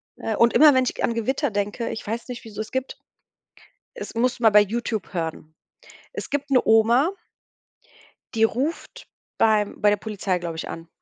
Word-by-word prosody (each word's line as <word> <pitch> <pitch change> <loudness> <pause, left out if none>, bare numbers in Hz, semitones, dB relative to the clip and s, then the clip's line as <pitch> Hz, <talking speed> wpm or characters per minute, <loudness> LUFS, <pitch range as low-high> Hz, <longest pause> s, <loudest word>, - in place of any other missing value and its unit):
Äh, 220 - -3
und 235 0 +4
immer, 300 -2 +7
wenn 260 -1 +3
ich - - -2
g - - -6
an 235 - +1
Gewitter 260 +3 -1
denke, 205 +3 -2
ich 220 - -7
weiß 230 +3 -4
nicht, 240 -2 -7
wieso 215 -1 -6
es 220 - -8
gibt, 260 0 -3 1.0
es 470 - -8
musst 245 +1 0
mal 225 -2 +5
bei 210 0 +6
Youtube 220 0 -3
hören. 160 -2 -5 0.6
Es - - -7
gibt 285 0 -3
'ne 255 - +5
Oma 235 - +4 1.2
die 225 0 +3
ruft 290 - -3 0.3
beim 215 -2 +2
bei 210 -1 +4
der 205 - +2
Polizei, 200 -3 -3
glaube 170 -2 -5
ich, - - -5
an. 165 0 -8
225 Hz, 185 wpm, -23 LUFS, 205-255 Hz, 1.2 s, immer